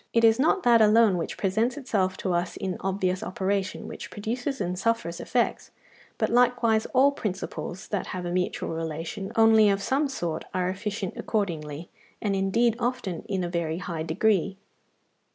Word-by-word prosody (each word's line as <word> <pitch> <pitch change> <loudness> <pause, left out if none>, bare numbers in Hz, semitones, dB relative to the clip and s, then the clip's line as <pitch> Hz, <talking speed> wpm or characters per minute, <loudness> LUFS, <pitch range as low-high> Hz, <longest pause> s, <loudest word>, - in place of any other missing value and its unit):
It 230 - +3
is 225 +1 +5
not 325 +7 +3
that 235 -2 +6
alone 215 -1 +5
which 170 - -3
presents 220 +6 0
itself 190 -9 0
to 185 - +1
us 175 0 -1
in 185 -2 -3
obvious 190 -1 -1
operation 195 +1 -2
which - - -8
produces 245 +6 -3
and 180 -1 -2
suffers 230 -6 -1
effects, 245 -1 -1 0.5
but - - 0
likewise 240 -2 +3
all 275 +2 +4
principles 190 -6 -5
that 205 -3 -2
have 180 -1 -5
a 175 - -3
mutual 180 0 -1
relation 165 +5 -4
only 225 -1 +6
of 195 0 +2
some 270 +8 +1
sort 170 - -3
are 180 0 +1
efficient 200 0 -3
accordingly, 165 -7 -3 0.3
and 200 -2 0
indeed 215 +4 +2
often 240 -9 -2
in 190 -2 -1
a - - -1
very 170 -2 -2
high 170 -3 -4
degree. 195 +3 +1
195 Hz, 165 wpm, -26 LUFS, 180-230 Hz, 0.5 s, that